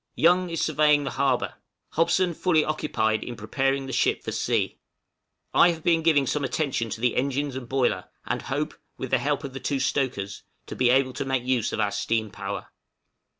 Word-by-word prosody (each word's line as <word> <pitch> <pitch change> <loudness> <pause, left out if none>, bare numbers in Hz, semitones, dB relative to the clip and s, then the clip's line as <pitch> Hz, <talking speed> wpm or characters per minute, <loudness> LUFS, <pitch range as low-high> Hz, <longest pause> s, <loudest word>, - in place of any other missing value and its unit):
Young 180 +2 +4
is 165 -1 -3
surveying 150 -1 +3
the 135 - -3
harbor. 135 -2 0 0.4
Hobson 170 +2 +2
fully 160 -2 +2
occupied 110 -8 0
in 120 - -6
preparing 135 +5 -1
the 135 - -6
ship 120 - +1
for - - -4
sea. - - -1 0.7
I 175 - +6
have 165 -2 -3
been 165 -2 +3
giving 155 -4 +4
some 145 +2 -1
attention 135 -5 -1
to 110 - -5
the 125 -1 +2
engines 140 +1 -1
and 125 -2 -6
boiler, 130 -2 0 0.2
and - - -2
hope, - - -2 0.2
with - - -5
the - - +4
help - - -1
of 135 - -6
the 135 - -5
two 140 -1 -1
stokers, 125 -7 -1 0.2
to - - -7
be 125 -1 +3
able 130 0 +3
to - - -3
make 135 -2 -1
use 125 -3 0
of - - -3
our 105 -1 +1
steam 110 -1 -1
power. - - -5
135 Hz, 195 wpm, -26 LUFS, 125-155 Hz, 0.7 s, I